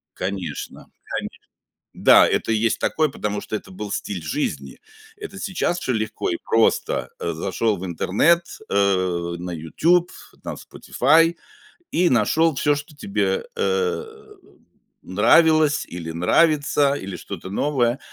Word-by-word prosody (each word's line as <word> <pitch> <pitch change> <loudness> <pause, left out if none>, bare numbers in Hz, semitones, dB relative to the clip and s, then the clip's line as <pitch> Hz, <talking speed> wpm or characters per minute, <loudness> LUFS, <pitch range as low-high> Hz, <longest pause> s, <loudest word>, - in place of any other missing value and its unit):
Конечно, 95 0 -5
конечно. - - -6 0.5
Да, - - +6
это - - 0
есть 110 +1 +1
такой, 155 -2 +1
потому 105 -4 -3
что 110 - -4
это - - -10
был 100 +2 -7
стиль 100 -3 -4
жизни. 145 - -3 0.4
Это 415 - -9
сейчас 180 -2 -1
всё 130 - -1
легко 110 0 -2
и 85 - -1
просто, 115 0 +1
э, 85 - -3
зашел 100 +6 -1
в 90 - -6
интернет, 125 - +2 0.2
э, 95 -3 +1
на 90 +1 -6
"Ютуб", 165 - +1 0.3
на - - -5
"Спотифай" 165 +2 +2 0.6
и 175 +1 +3
нашел 140 +7 +2
всё, 145 +2 +2
что 150 +1 -8
тебе, 205 - -1
э, 460 -1 0 1.0
нравилось, 155 -2 +4
или 85 -2 -6
нравится, 145 - +2
или 95 -9 -5
что-то 95 +1 -8
новое, 125 +2 0
120 Hz, 130 wpm, -22 LUFS, -, 1.0 s, Да